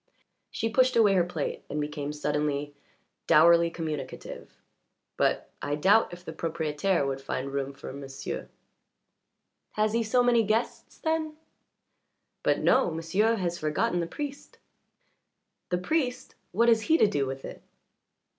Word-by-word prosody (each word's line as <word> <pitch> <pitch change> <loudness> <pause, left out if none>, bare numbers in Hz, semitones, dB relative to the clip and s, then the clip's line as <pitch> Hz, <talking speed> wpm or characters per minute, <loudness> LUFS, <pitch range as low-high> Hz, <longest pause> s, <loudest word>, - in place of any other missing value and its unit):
She 225 - -2
pushed 255 +2 +3
away 215 -4 +5
her 185 -2 +4
plate 170 -4 -4
and 150 - -3
became 150 -1 -3
suddenly 150 -1 -2 0.5
dourly 170 +2 +6
communicative. 155 -5 -6 0.6
"But - - 0
I 145 0 -1
doubt 195 +9 +4
if 175 +1 -11
the 160 - -6
propriétaire 160 +1 -1
would 135 0 -3
find 135 0 -4
room 140 0 -2
for 140 -1 -9
m'sieu'." 140 0 -6 1.3
"Has 215 0 +1
he 230 - +2
so 245 +3 +2
many 240 -1 +4
guests, 225 +2 -2
then?" 315 -1 -2 1.0
"But - - +1
no. - - +4
M'sieu' 175 +8 +1
has 175 -4 -2
forgotten 155 +3 0
the 170 - -1
priest." 285 - -7 1.1
"The 180 - +1
priest? 250 - -1 0.2
What 230 +6 +2
has 225 -1 +5
he 325 - +6
to 220 - +5
do 145 -10 0
with 135 0 -6
it?" - - -9
170 Hz, 140 wpm, -28 LUFS, 150-225 Hz, 1.3 s, dourly